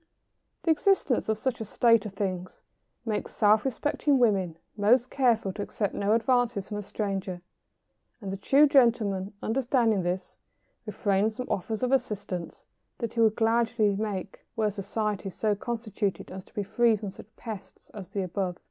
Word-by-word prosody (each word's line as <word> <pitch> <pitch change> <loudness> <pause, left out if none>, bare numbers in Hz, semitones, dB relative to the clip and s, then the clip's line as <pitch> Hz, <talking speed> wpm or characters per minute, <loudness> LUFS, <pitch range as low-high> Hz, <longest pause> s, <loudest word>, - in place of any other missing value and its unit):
] - - -50
The 330 - +3
existence 315 - +2
of 220 - +1
such 245 +1 -2
a - - -1
state 230 0 +3
of 195 - -11
things 185 -2 -4 0.4
makes 215 -2 -3
self 210 0 +4
respecting 285 +2 +1
women 195 -9 +2 0.2
most 235 +5 +3
careful 230 -7 +2
to 205 - -5
accept 205 0 -2
no 200 +1 +1
advances 235 -3 +1
from 210 - -4
a - - -3
stranger, 195 -3 -4 0.8
and 195 -4 -5
the - - -4
true 275 +9 +5
gentleman, 225 -8 +3
understanding 235 -3 +2
this, 180 +1 -3 0.5
refrains 210 +1 0
from 250 - -4
offers 220 +5 -2
of 250 - +1
assistance 200 -9 -2 0.3
that 230 -2 -4
he 235 - -3
would 220 -2 +4
gladly 225 -2 +2
make 200 -3 -4
were 215 -3 +1
society 205 0 -3
so 210 +3 0
constituted 215 -2 -3
as 185 0 -8
to - - -24
be 205 - -1
free 230 +3 +3
from 205 -2 -5
such 195 - -13
pests 220 -4 -9
as 200 -4 -9
the 200 - -2
above. 185 0 -3
215 Hz, 165 wpm, -28 LUFS, 195-235 Hz, 0.8 s, true